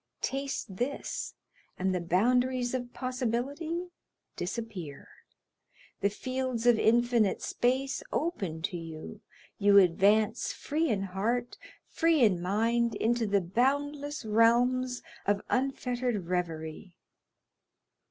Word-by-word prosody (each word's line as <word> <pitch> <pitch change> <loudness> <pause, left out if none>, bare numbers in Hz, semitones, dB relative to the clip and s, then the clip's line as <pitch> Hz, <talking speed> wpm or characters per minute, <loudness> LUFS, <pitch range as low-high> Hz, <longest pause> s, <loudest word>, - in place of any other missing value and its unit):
taste 270 -8 -3
this, 270 +6 -3 0.4
and 190 0 0
the 180 - -1
boundaries 245 +8 +2
of 245 -1 -3
possibility 270 +8 -2 0.5
disappear; 180 - -5 0.9
the 200 - +2
fields 255 +2 -3
of 240 -2 +5
infinite 235 -2 +3
space 265 +3 0
open 195 - -2
to 180 -1 -2
you, 160 - -8 0.4
you 200 0 +6
advance 205 +5 +4
free 315 +2 -1
in 200 -3 0
heart, 225 +6 -1 0.3
free 325 -3 +2
in 185 -6 +3
mind, 230 +5 +1
into 235 0 +1
the 200 -1 +2
boundless 285 - -1
realms 245 +3 +3 0.2
of 205 0 +1
unfettered 250 -5 -1
reverie. 170 0 -4
235 Hz, 105 wpm, -30 LUFS, 195-255 Hz, 0.9 s, you